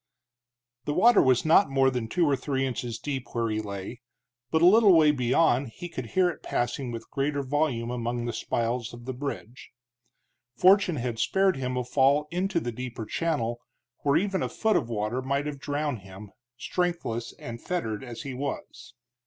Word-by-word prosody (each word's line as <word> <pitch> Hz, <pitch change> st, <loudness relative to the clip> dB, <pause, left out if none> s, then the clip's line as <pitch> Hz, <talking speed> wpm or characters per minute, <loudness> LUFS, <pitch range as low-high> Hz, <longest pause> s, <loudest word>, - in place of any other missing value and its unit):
The 145 Hz, -, -1 dB
water 230 Hz, +3 st, +6 dB
was 130 Hz, +3 st, +3 dB
not 165 Hz, +4 st, +5 dB
more 135 Hz, -1 st, +3 dB
than 125 Hz, -3 st, -3 dB
two 170 Hz, +8 st, +1 dB
or 145 Hz, -2 st, +3 dB
three 135 Hz, 0 st, -1 dB
inches 120 Hz, -3 st, -3 dB
deep 135 Hz, -3 st, -5 dB
where 115 Hz, -1 st, 0 dB
he 110 Hz, 0 st, -1 dB
lay, 100 Hz, +4 st, -7 dB, 0.5 s
but 160 Hz, +3 st, +2 dB
a -, -, +8 dB
little 200 Hz, -1 st, +7 dB
way 155 Hz, -2 st, +6 dB
beyond 130 Hz, 0 st, +2 dB
he 175 Hz, +10 st, -8 dB
could 130 Hz, -7 st, -6 dB
hear 185 Hz, -1 st, +5 dB
it -, -, -13 dB
passing 120 Hz, +1 st, -2 dB
with 115 Hz, -1 st, -8 dB
greater 140 Hz, +1 st, -1 dB
volume 130 Hz, -4 st, -1 dB
among 120 Hz, 0 st, -2 dB
the 120 Hz, -, -3 dB
spiles 120 Hz, 0 st, -2 dB
of 120 Hz, 0 st, -12 dB
the 130 Hz, -, -4 dB
bridge. 130 Hz, -2 st, -6 dB, 0.9 s
Fortune 185 Hz, +2 st, +5 dB
had 120 Hz, -4 st, -3 dB
spared 190 Hz, -, +2 dB
him 125 Hz, -1 st, -2 dB
a 125 Hz, -, 0 dB
fall 140 Hz, +4 st, +2 dB
into 180 Hz, 0 st, 0 dB
the 120 Hz, -, -4 dB
deeper 120 Hz, -1 st, -6 dB
channel, 120 Hz, -6 st, -2 dB, 0.4 s
where 140 Hz, -1 st, +2 dB
even 195 Hz, 0 st, 0 dB
a -, -, -1 dB
foot 220 Hz, -1 st, +1 dB
of 115 Hz, -, 0 dB
water 110 Hz, +3 st, -2 dB
might 140 Hz, +2 st, -1 dB
have 145 Hz, -2 st, -5 dB
drowned 145 Hz, -3 st, -2 dB
him, 95 Hz, +1 st, -12 dB, 0.3 s
strengthless 130 Hz, -4 st, -2 dB
and 115 Hz, 0 st, -8 dB
fettered 115 Hz, -, -3 dB
as 120 Hz, 0 st, -7 dB
he 140 Hz, -3 st, -5 dB
was. 135 Hz, +2 st, -6 dB
130 Hz, 185 wpm, -27 LUFS, 120-155 Hz, 0.9 s, a